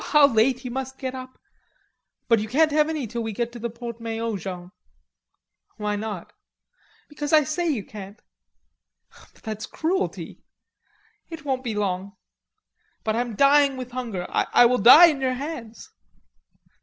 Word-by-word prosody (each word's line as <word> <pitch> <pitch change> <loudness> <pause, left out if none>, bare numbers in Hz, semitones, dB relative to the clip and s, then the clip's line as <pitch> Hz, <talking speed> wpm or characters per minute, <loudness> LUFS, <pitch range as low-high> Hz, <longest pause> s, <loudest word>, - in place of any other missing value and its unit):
"How 300 -2 +5
late 250 +1 +1
you 250 - -4
must 265 +1 -5
get 260 -1 -4
up!... 255 0 -9 0.9
But 230 -3 +4
you 215 - -3
can't 310 +5 +3
have 300 +1 +2
any 310 -5 -2
till 235 +2 -5
we 225 -1 -4
get 235 +3 -2
to 240 - -10
the 235 +1 -3
Porte 235 0 -8
Maillot, 225 -2 -3
Jean." 180 -1 -7 1.1
"Why 210 -1 -2
not?" 205 -4 -6 0.7
"Because 295 -1 -5
I 310 -1 +6
say 310 +4 -2
you 250 -10 -1
can't." 205 +1 -10 1.1
"But - - -25
that's 215 -1 -5
cruelty." 370 +5 -3 0.9
"It 325 -2 -9
won't 260 -2 -1
be 230 -4 -3
long." 200 0 -3 0.9
"But 215 0 -1
I 235 - +1
am 240 -3 -5
dying 280 +1 +4
with 250 -1 -7
hunger. 230 -8 -4
I 245 - +3
will 250 +1 +3
die 250 - +10
in 300 -5 +1
your 260 -1 +1
hands." 250 -6 -7
245 Hz, 160 wpm, -24 LUFS, 220-280 Hz, 1.1 s, die